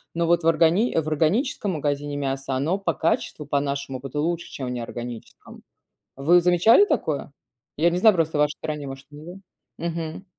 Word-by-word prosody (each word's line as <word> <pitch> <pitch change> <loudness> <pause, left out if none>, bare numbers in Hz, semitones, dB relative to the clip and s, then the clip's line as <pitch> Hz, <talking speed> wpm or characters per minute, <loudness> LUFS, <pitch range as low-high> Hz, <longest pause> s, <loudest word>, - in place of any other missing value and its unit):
но 170 0 +1
вот 170 0 +2
в - - +1
органи 165 +8 +3
в 160 - +1
органическом 190 - 0
магазине 145 -1 -2
мясо, 135 -1 -3
оно 150 +8 0
по 195 - -1
качеству, 160 -2 -1
по 145 0 0
нашему, 140 -2 -4
будто 135 +2 -5
лучше, 170 +2 -2
чем 130 - -6
в - - -3
неорганическом. 120 -1 -8 0.5
Вы 170 +6 +4
замечали 180 - +5
такое? 160 - -2 0.5
Я 165 +4 +4
не 175 - -1
знаю, 220 +1 +6
просто 160 -3 0
в - - +3
вашей 150 0 +1
стране, 150 -2 -4
может, 135 0 -9
нет. 160 +6 -10 0.4
Мгм. 165 +1 -4
155 Hz, 180 wpm, -24 LUFS, 140-170 Hz, 0.5 s, знаю